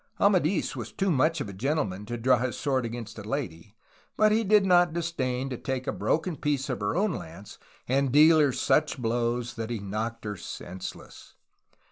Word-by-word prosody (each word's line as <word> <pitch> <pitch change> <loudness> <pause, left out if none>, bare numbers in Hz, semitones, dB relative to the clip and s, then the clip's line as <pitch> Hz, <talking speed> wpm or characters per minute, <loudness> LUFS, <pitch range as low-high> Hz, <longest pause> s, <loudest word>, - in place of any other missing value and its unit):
Amadis 185 -5 +2
was 120 -4 -6
too 195 -1 0
much 155 +2 +2
of 130 - -3
a 100 - -8
gentleman 105 -4 -2
to 120 - -3
draw 125 +1 +3
his 125 0 -2
sword 130 -4 0
against 115 -1 -7
a - - -7
lady, 105 - -5 0.4
but 215 0 +5
did 215 -2 +4
not 175 -3 +4
disdain 135 -7 -2
to 125 - -3
take 130 0 -3
a - - -1
broken 165 +2 -1
piece 140 -1 -1
of 125 - -3
her 100 +6 -1
own 200 +3 +2
lance 85 - -9 0.3
and 135 +1 +1
deal 155 +3 +7
her 145 -3 +4
such 150 +4 +1
blows 120 0 -1
that 115 0 -5
he 120 - -2
knocked 110 +3 -4
her 105 -1 -4
senseless. 90 +2 -9
130 Hz, 185 wpm, -27 LUFS, 115-155 Hz, 0.4 s, deal